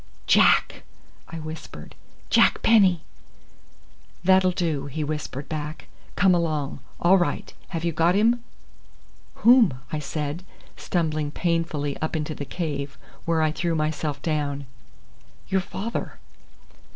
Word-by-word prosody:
"Jack!" - - +4 0.5
I 165 - -7
whispered. 155 0 -8 0.4
"Jack - - +4
Penny!" 190 -7 +5 1.2
"That'll 185 0 +5
do," 160 -6 -1
he 150 +3 -3
whispered 150 -2 -4
back. 155 0 -6 0.3
"Come 190 -2 +4
along. 155 -5 -1 0.2
All 185 +3 +5
right! 175 - -2
Have 165 -3 -4
you 170 - +1
got 165 +3 +2
him?" 230 +3 +3 1.0
"Whom?" 235 - +7 0.2
I 155 - -1
said, 150 +3 -4 0.3
stumbling 155 -4 -1
painfully 165 -3 -1
up 155 - -2
into 155 0 -2
the 145 - -6
cave, 140 -4 -4 0.3
where 165 -1 +2
I 155 - +2
threw 170 +1 -1
myself 155 -2 -1
down. 145 -3 -1 0.8
"Your 190 0 +2
father." 215 +5 -5
160 Hz, 120 wpm, -25 LUFS, 150-175 Hz, 1.2 s, Whom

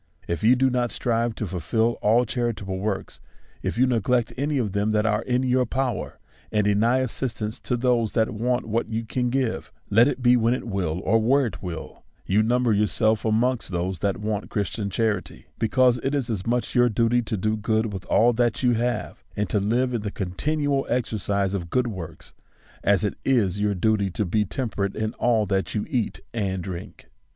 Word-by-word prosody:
If 85 +4 -3
you 120 +4 +6
do 130 +1 +2
not 120 -1 +1
strive 115 -1 -1
to 110 - -3
fulfil 100 +6 0
all 115 +4 +4
charitable 110 -6 -2
works, 100 0 -3 0.4
if - - -3
you 130 - +5
neg 120 -5 0
lect 120 -2 +2
any 145 +2 -1
of 110 -6 0
them 105 +2 0
that 105 0 +2
are 105 0 +2
in 125 +1 0
your 125 -1 +2
power, 125 -2 -2 0.3
and 105 -1 +1
deny 115 +5 +3
as 130 -4 -2
sistance 110 -4 -3
to 125 - -1
those 120 -3 +1
that 110 -1 +1
want 120 +3 0
what 115 +1 -1
you 115 0 -2
can 125 +2 -1
give, 130 -2 -1 0.2
let 115 +5 +6
it 135 -3 -2
be 125 0 +6
when 120 +1 +2
it - - -6
will 90 -5 -2
or 115 +4 +3
where 135 +5 +3
it 115 - -5
will, 90 -3 -7 0.2
you 100 +3 +3
number 120 +1 +2
yourself 110 +1 +1
amongst 115 +3 +1
those 90 0 -2
that 100 -2 0
want 105 -1 -3
Christian 100 0 -2
charity; 105 -2 -2
because 125 +2 +3
it 135 +4 -1
is 130 -4 -1
as 100 -2 -3
much 120 +1 0
your 125 -1 +4
duty 115 +2 +2
to 110 -2 -3
do 110 +3 0
good 110 0 0
with 95 -1 -5
all 120 +2 +4
that 120 +1 0
you 125 - +4
have, 120 +1 -2
and 105 0 0
to 105 - +2
live 120 +5 +1
in 115 - -1
the 105 - -3
continual 140 - -1
exercise 100 -4 0
of 85 -4 -3
good 125 +4 +1
works, 85 -8 -7 0.5
as 100 0 +3
it 105 - 0
is 105 -7 +1
your 105 -1 +1
duty 100 +1 +1
to 105 +3 -2
be 105 +4 +1
temperate 100 -3 -2
in 110 +1 -2
all 115 -3 +3
that 95 +1 -1
you 105 - -1
eat 120 -5 -2
and 95 -5 -2
drink. 95 +2 -8
110 Hz, 205 wpm, -24 LUFS, 100-125 Hz, 0.5 s, you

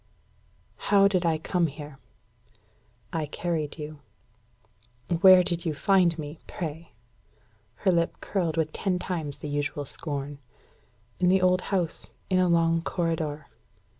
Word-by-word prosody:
"How 200 -1 +6
did 185 -3 +1
I 160 -1 +2
come 170 +2 0
here?" 145 -1 -9 1.1
"I 160 -2 -1
carried 160 -1 -3
you." 150 -1 -7 1.2
"Where 185 0 +8
did 170 -1 -1
you 160 -4 -2
find 180 -1 +3
me, 150 0 -7
pray?" 160 0 -6 0.9
Her 190 - +6
lip 170 -1 0
curled 170 -5 -2
with 155 -1 0
ten 190 -2 0
times 160 -6 -4
the - - -7
usual 145 0 -2
scorn. 140 0 -4 0.8
"In 180 - +3
the 190 0 +3
old 185 0 +4
house, 180 -5 -1 0.2
in 185 - +4
a 180 -1 +3
long 165 -1 +3
corridor." 160 -4 -2
165 Hz, 135 wpm, -27 LUFS, 150-180 Hz, 1.2 s, Where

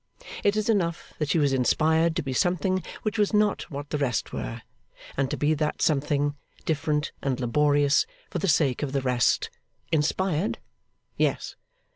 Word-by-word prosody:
It 205 0 +3
is 215 - 0
enough 175 -7 0
that 150 -2 -1
she 155 - +2
was 145 -3 +3
inspired 160 +6 +2
to 170 - -1
be 135 -2 -3
something 180 +4 +1 0.2
which 215 0 -1
was 210 +1 +2
not 210 -1 +1
what 145 0 -7
the 150 - -1
rest 125 -7 -1
were, - - -5 0.5
and 135 -1 0
to - - -2
be 150 +1 +2
that 150 0 -1
something, 145 -1 +1 0.3
different 150 -1 0
and 135 -2 -1
laborious, 145 - +3 0.2
for - - -2
the 195 - -1
sake 145 -6 +2
of 140 -2 -2
the 135 - +1
rest. 125 -3 +1 0.4
Inspired? 165 +4 +1 0.6
Yes. - - 0
150 Hz, 165 wpm, -26 LUFS, 140-170 Hz, 0.6 s, It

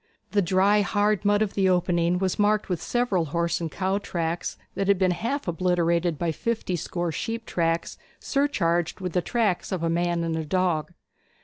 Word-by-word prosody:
The 205 - +3
dry 195 +3 +3
hard 205 0 +1
mud 205 +1 +4
of 210 - -3
the 190 -2 +2
opening 175 -1 +2
was 190 +1 -1
marked 210 0 +2
with 175 -3 -1
several 240 -9 0
horse 170 +3 -1
and 165 -2 -3
cow 190 +1 0
tracks, 170 -3 -3 0.2
that 195 - -2
had 200 -1 +4
been 185 -1 +2
half 235 +10 -2
obliterated 170 -1 +1
by 170 +1 0
fifty 215 +2 -2
score 175 0 -3
sheep 225 +7 -4
tracks, 165 -1 -1 0.2
surcharged 175 - 0
with 180 -3 -4
the 180 - +2
tracks 210 -4 0
of 185 -3 -2
a 165 - +1
man 170 0 0
and 165 -1 -1
a 160 - -2
dog. 175 -1 0
180 Hz, 185 wpm, -25 LUFS, 170-205 Hz, 0.2 s, mud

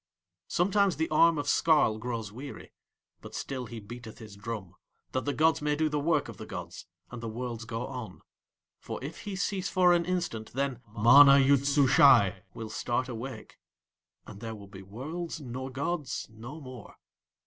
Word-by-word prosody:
Sometimes 195 +1 +2
the 160 +1 0
arm 165 +1 +5
of 145 - -2
Skarl 150 -11 +3
grows 115 -3 -4
weary; 135 +6 -9 0.5
but - - -10
still 130 -3 -4
he 115 0 -7
beateth 110 +2 -10
his 110 -3 -11
drum, 100 -3 -6 0.4
that 130 - -2
the 145 - +1
gods 155 0 +2
may 150 0 +1
do 155 +1 +1
the 150 0 -1
work 150 -1 +1
of - - -9
the - - -9
gods, - - -8 0.2
and 125 -1 -7
the 115 - -4
worlds 115 0 -5
go 115 +1 -4
on, 125 -4 -7 0.6
for - - -6
if 145 +4 -6
he 205 -2 -4
cease 195 0 -2
for 180 -1 +4
an 170 -1 +2
instant 170 -12 -3
then 135 -2 -2 0.2
MANA 140 +5 +8
YOOD 140 0 +4
SUSHAI 135 -8 +5
will 110 -1 -6
start 125 +4 -1
awake, 125 +3 -7 0.7
and 100 - -11
there 115 -1 -5
will 100 -1 -11
be 95 -1 -11
worlds 155 - -6
nor 130 -1 -6
gods 145 +1 -3
no 120 +8 -9
more. 130 -6 -11
130 Hz, 175 wpm, -29 LUFS, 115-155 Hz, 0.7 s, MANA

